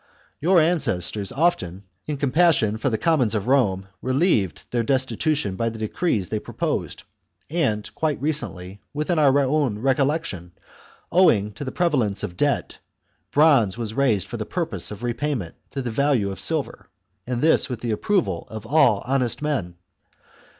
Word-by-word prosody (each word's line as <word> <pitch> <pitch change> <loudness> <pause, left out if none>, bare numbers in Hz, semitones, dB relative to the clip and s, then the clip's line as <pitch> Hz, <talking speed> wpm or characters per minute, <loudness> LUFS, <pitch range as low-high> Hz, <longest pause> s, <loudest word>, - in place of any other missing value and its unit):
Your 175 +3 +4
ancestors 110 - +1
often, 100 - 0 0.2
in 150 -1 -2
compassion 140 -6 +2
for 135 - 0
the 110 - -1
commons 135 -9 +2
of 105 +1 -2
Rome, 100 -8 +2
relieved 130 - +1
their 120 - +1
destitution 130 - 0
by 115 +3 -1
the 110 - -8
decrees 110 - -1
they 110 - -1
proposed; - - -3 0.5
and, 130 -11 0
quite 155 -3 -1
recently, 100 -10 -2
within 155 +3 0
our 140 -2 +4
own 140 -5 +1
recollection, 135 - -1 0.6
owing 110 - +4
to 105 - -8
the 130 - -4
prevalence 130 - 0
of 90 -4 -4
debt, - - -1 0.5
bronze 140 -10 +4
was 115 -2 -4
raised 115 -8 +2
for - - -4
purposes - - -3
of 105 +2 -9
repayment 120 - -2 0.2
to 135 - -4
the 120 - -3
value 120 -5 +1
of 95 - -7
silver, - - -1 0.4
and 125 0 -2
this 160 -2 +4
with 120 -3 -5
the 120 - -2
approval 110 - 0
of 110 0 -8
all 120 -6 +3
honest 130 -2 0
men. 125 -13 -2
125 Hz, 150 wpm, -23 LUFS, 105-150 Hz, 0.6 s, Your